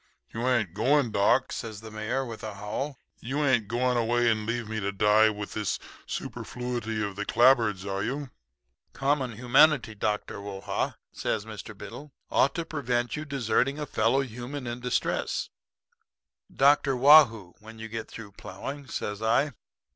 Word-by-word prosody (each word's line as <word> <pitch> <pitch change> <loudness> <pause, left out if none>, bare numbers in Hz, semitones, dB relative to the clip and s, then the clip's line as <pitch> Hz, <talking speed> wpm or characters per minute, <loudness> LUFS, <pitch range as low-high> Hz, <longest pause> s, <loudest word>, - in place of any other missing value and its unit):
"'You 115 +2 -2
ain't 115 -9 +1
going, 125 +4 +2
doc?' 105 +6 +3
says 110 -3 -6
the 110 -1 -10
Mayor 110 +5 -2
with 115 -3 -8
a 110 -2 -6
howl. 110 +8 -4 0.2
'You 140 +5 -1
ain't 120 -6 +2
going 125 +3 +1
away 120 0 +2
and 110 -1 -2
leave 115 -1 -2
me 110 0 -3
to 100 -1 -1
die 105 +2 +4
with 105 -1 -6
this 105 -2 -1 0.3
superfluity 120 -3 -4
of 100 -2 -4
the 105 - -3
clapboards, 115 -5 +3
are 100 0 -2
you?' 140 0 -3 0.6
"'Common 135 -2 0
humanity, 125 +2 +4
Dr. 105 -1 -2
Whoa 100 -1 -7
ha,' - - -2 0.2
says 105 -1 -2
Mr. 110 -1 -9
Biddle, 140 +9 -9 0.2
'ought 140 - +3
to 170 - -2
prevent 125 -6 -1
your 150 - -5
deserting 135 0 0
a 150 - -3
fellow 120 +1 +2
human 125 +2 -6
in 120 0 -4
distress.' 125 0 -1 1.0
"'Dr. 140 0 +4
Waugh 145 +4 +9
hoo, 105 -7 -11
when 110 +1 -12
you 110 0 -7
get 115 0 -5
through 105 -3 -10
plowing,' 130 +9 -8
says 105 -2 -4
I. 115 +6 +2
115 Hz, 165 wpm, -27 LUFS, 110-135 Hz, 1.0 s, Waugh